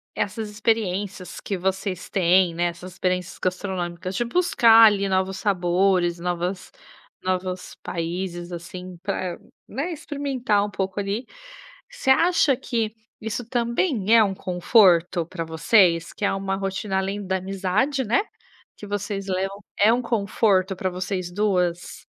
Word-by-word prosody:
essas 215 +1 -2
experiências 205 -3 -2
que 200 - -3
vocês 190 0 -3
têm, 180 -1 +3
né, 175 - 0
essas 175 +1 -5
experiências 185 0 -2
gastronômicas 185 -1 -3
de 240 - 0
buscar 235 -7 +6
ali 200 -1 +2
novos 190 0 0
sabores, 180 -2 +1
novas 180 +2 -3 0.5
novos 185 0 -3
países, 175 +1 -4
assim, 180 +1 -8
para, 185 -3 -3 0.3
né, 280 - -3
experimentar 275 -9 -1
um - - -5
pouco 190 +1 -3
ali, 205 +5 -2 0.7
você 475 - +1
acha 325 -1 +4
que 230 -4 -2 0.3
isso 220 +2 -4
também 235 - +1
é 225 - +7
um 195 -2 0
conforto 180 -2 +3
pra 170 0 -5
vocês? 165 +1 +3
Que 205 - -2
é - - +1
uma 195 0 -2
rotina 195 0 -2
além 195 +1 -3
da 190 0 0
amizade, 195 +9 -1
né, 240 - +2 0.5
que 205 - -9
vocês 200 -1 -3
levam, 195 +2 -2 0.2
é 205 - +6
conforto 200 -4 +1
pra 185 0 -2
vocês 185 0 -4
2? 180 -3 -1
195 Hz, 135 wpm, -24 LUFS, 180-215 Hz, 0.7 s, é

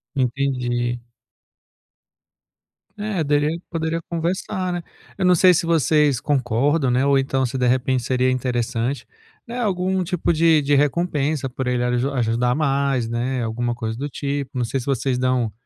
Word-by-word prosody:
Entendi. 125 -2 -1 2.0
É 205 -5 -2
dele 150 +3 +1
poderia 165 0 -1
conversar, 185 +2 -2
né? 175 -1 -3 0.3
Eu 190 - 0
não 180 - +6
sei 180 +1 +6
se 170 -1 +1
vocês 150 -4 +2
concordam, 135 +1 +1
né, 125 +2 +2
ou 140 -1 +4
então 135 0 0
se, 130 +1 -2
de 125 - +1
repente, 130 0 +1
seria 130 +1 +1
interessante, 125 0 -1 0.4
né, 235 +2 -6
algum 190 -3 0
tipo 175 -1 -1
de 160 -1 +4
de 145 0 +2
recompensa 145 -1 0
por 130 +1 -4
ele 125 -1 0
aju 125 +2 0
ajudar 120 -1 +1
mais, 140 -4 0
né, 120 +1 -1
alguma 120 +2 -2
coisa 110 -1 -4
do 140 +3 -3
tipo. 140 -1 -4
Não 125 - 0
sei 130 +3 -2
se 125 - -7
vocês 135 -2 0
dão 125 -3 +1
135 Hz, 155 wpm, -22 LUFS, 125-160 Hz, 2.0 s, não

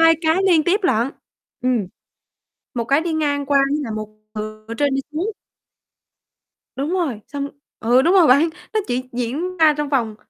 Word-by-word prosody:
2 330 0 +7
cái 320 0 +2
liên 330 -5 +4
tiếp 385 +4 +2
lận. 245 - +2 0.5
Ừm. 245 -6 +1 0.9
Một 235 -1 -1
cái 275 +5 +3
đi 330 0 -2
ngang 285 -3 0
qua 280 -1 +3
với 295 +1 0
lại 225 - -4
một 215 0 -5 0.3
từ 215 0 -6
ở 230 - -4
trên 285 -2 +2
đi 270 - +1
xuống. 360 +8 -1 1.5
Đúng 275 +3 -2
rồi, 285 - -1
xong 280 +1 -4 0.3
ừ, 245 +3 +4
đúng 340 +7 +3
rồi 360 -5 +6
bạn, 285 +6 +5 0.2
nó 435 - +2
chỉ 255 +1 -2
diễn 280 +10 -3
ra 315 -2 +6
trong 295 -1 -2
vòng 230 -6 0
280 Hz, 185 wpm, -21 LUFS, 245-325 Hz, 1.5 s, 2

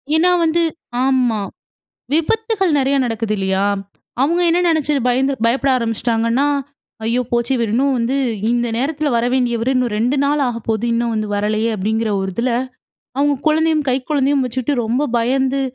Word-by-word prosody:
ஏன்னா 350 +3 +4
வந்து 330 +1 +2 0.4
ஆமா. 250 -5 +2 0.7
விபத்துகள் 400 +3 +1
நெறையா 275 0 +2
நடக்குது 225 -2 -2
இல்லையா? 190 0 0 0.6
அவங்க 335 +6 +2
என்ன 340 +1 +2
நெனைச்சு 315 -3 +1
பயந்து 265 +3 +2
பயப்பட 265 +4 +1
ஆரம்பிச்சுட்டாங்கன்னா, 230 +2 0 0.6
"ஐயோ 235 +3 +1
போச்சு! 235 +1 0
இவரின்னும் 240 +4 +1
வந்து 240 +3 0 0.3
இந்த 240 0 +1
நேரத்தில 290 +3 -1
வர 235 0 +1
வேண்டியவரு, 245 0 +1
இன்னும் 250 -3 0
2 245 +6 +1
நாள் 290 +1 +1
ஆகப்போகுது, 230 -1 -2
இன்னும் 235 0 0
வந்து 215 -1 -2
வரலயே." 215 +2 0
அப்படீங்கிற 220 +3 -1
ஒரு 190 0 -3
இதில, 245 +2 0 0.7
அவங்க 285 0 +2
குழந்தையும் 310 -1 +2
கை 255 - +2
குழந்தையும் 280 -2 +2
வச்சுட்டு 255 +3 -2
ரொம்ப 240 +6 0
பயந்து, 265 +3 +1
250 Hz, 145 wpm, -18 LUFS, 230-285 Hz, 0.7 s, ஏன்னா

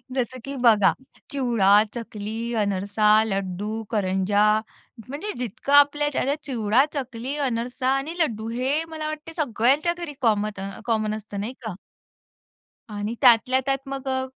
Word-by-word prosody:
जसं 255 0 -2
की 275 0 -5
बघा 215 -5 +6 0.4
चिवडा, 225 -7 +4
चकली, 225 0 -5
अनरसा, 205 +2 +3
लड्डू, 200 +1 -3
करंजा 200 -1 +1 0.6
म्हणजे 295 +11 -4
जितकं 250 +3 -3
आपल्याच्याने 285 -1 +4
चिवडा, 235 -2 +2
चकली, 260 -1 -4
अनरसा 250 -1 -2
आणि 275 +4 -3
लड्डू 225 -9 0
हे 260 +6 0
मला 315 -1 -5
वाटतं 310 +1 -6
सगळ्यांच्या 275 +7 +2
घरी 340 -4 -6
कॉमत 215 -3 +1
अ, 195 +1 -4 0.2
कॉमन 215 -2 0
असतं, 210 -1 -7
नाही 215 +5 -4
का? 220 - -3 1.2
आणि 210 +1 -4
त्यातल्या 255 +1 +5
त्यात 270 0 +1
मग 275 0 -5
अ, 260 0 0
235 Hz, 135 wpm, -24 LUFS, 210-275 Hz, 1.2 s, बघा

